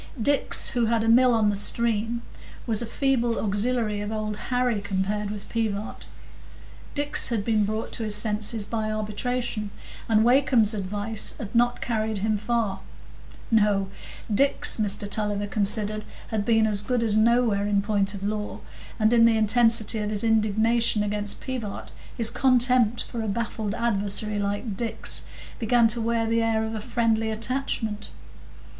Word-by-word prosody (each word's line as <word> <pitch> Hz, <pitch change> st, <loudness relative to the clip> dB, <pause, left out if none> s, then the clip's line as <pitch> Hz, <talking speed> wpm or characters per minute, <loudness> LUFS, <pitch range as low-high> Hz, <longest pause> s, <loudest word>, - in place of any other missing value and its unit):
Dix, 280 Hz, +5 st, +3 dB
who 240 Hz, -1 st, 0 dB
had 230 Hz, -1 st, +1 dB
a -, -, -1 dB
mill 250 Hz, +2 st, +5 dB
on 220 Hz, -3 st, +2 dB
the -, -, -3 dB
stream, 230 Hz, +2 st, +2 dB, 0.4 s
was 225 Hz, -2 st, +1 dB
a 235 Hz, -, -4 dB
feeble 240 Hz, -2 st, 0 dB
auxiliary 210 Hz, +1 st, -1 dB
of 205 Hz, +1 st, -5 dB
Old 215 Hz, -1 st, -3 dB
Harry 245 Hz, -4 st, 0 dB
compared 205 Hz, +1 st, -2 dB
with 205 Hz, -1 st, -7 dB
Pivart. 220 Hz, -2 st, -4 dB, 0.9 s
Dix 290 Hz, 0 st, +1 dB
had 220 Hz, -4 st, -2 dB
been 215 Hz, -2 st, +1 dB
brought 215 Hz, +2 st, -4 dB
to 230 Hz, -, -4 dB
his 210 Hz, -1 st, +1 dB
senses 210 Hz, 0 st, 0 dB
by 215 Hz, 0 st, -3 dB
arbitration, 215 Hz, +1 st, -3 dB, 0.4 s
and 220 Hz, -1 st, +4 dB
Wakem's 240 Hz, -3 st, +3 dB
advice 205 Hz, +2 st, -3 dB
had 210 Hz, -2 st, -8 dB
not 240 Hz, +1 st, +1 dB
carried 220 Hz, -2 st, -2 dB
him 215 Hz, +2 st, 0 dB
far. 215 Hz, -3 st, -1 dB, 0.7 s
No; 205 Hz, -3 st, +2 dB, 0.4 s
Dix, 275 Hz, +7 st, +3 dB
Mr 205 Hz, -1 st, -2 dB
Tulliver 205 Hz, -1 st, -1 dB
considered, 210 Hz, +1 st, -1 dB, 0.3 s
had 215 Hz, -2 st, -2 dB
been 225 Hz, -1 st, +3 dB
as 205 Hz, -2 st, +4 dB
good 240 Hz, +3 st, -1 dB
as 215 Hz, -2 st, +2 dB
nowhere 220 Hz, -2 st, +2 dB
in 200 Hz, -1 st, +1 dB
point 205 Hz, -1 st, -1 dB
of 195 Hz, -, -8 dB
law; 210 Hz, 0 st, -4 dB, 0.4 s
and 215 Hz, +1 st, +3 dB
in 230 Hz, -1 st, +5 dB
the 230 Hz, -1 st, +3 dB
intensity 225 Hz, 0 st, +3 dB
of 210 Hz, 0 st, -3 dB
his 210 Hz, 0 st, -1 dB
indignation 225 Hz, 0 st, +1 dB
against 205 Hz, 0 st, -2 dB
Pivart, 245 Hz, -6 st, -6 dB, 0.3 s
his 230 Hz, -1 st, +3 dB
contempt 245 Hz, -2 st, +3 dB
for 235 Hz, -, -6 dB
a 220 Hz, -, -4 dB
baffled 215 Hz, 0 st, -3 dB
adversary 210 Hz, -2 st, 0 dB
like 205 Hz, +1 st, -3 dB
Dix 230 Hz, +2 st, +2 dB, 0.3 s
began 235 Hz, 0 st, +3 dB
to 230 Hz, +1 st, +1 dB
wear 230 Hz, 0 st, 0 dB
the 230 Hz, +1 st, +1 dB
air 225 Hz, -1 st, 0 dB
of 220 Hz, -, -5 dB
a 220 Hz, -, -4 dB
friendly 225 Hz, -1 st, 0 dB
attachment. 220 Hz, -2 st, -2 dB
220 Hz, 160 wpm, -25 LUFS, 210-235 Hz, 0.9 s, mill